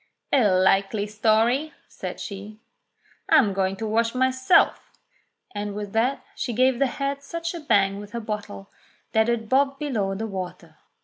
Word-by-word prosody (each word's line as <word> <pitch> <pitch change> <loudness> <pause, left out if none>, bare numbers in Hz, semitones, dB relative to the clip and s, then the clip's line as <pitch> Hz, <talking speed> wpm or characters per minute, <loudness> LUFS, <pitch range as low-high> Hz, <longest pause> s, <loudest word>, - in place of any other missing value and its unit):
"A 255 -6 +5
likely 195 +2 +2
story," 225 +7 +1
says - - -7
she. 205 +1 -8 0.7
"I'm 265 -11 +5
going 190 0 0
to 220 +3 -5
wash 230 +2 +1
myself.'* 260 +4 +2 0.6
And 205 -1 -4
with 205 -1 -6
that 245 +5 0
she 240 - -3
gave 255 +1 +3
the 275 - +3
head 275 +2 -3
such 335 +3 -5
a 340 - -5
bang 200 -9 +2
with 205 0 -10
her 235 - -2
bottle 210 -2 -6 0.4
that 220 +1 +3
it 230 -2 -1
bobbed 275 +3 +2
below 220 -10 -2
the 220 +3 -3
water. 180 -5 -7
220 Hz, 160 wpm, -24 LUFS, 200-260 Hz, 0.7 s, A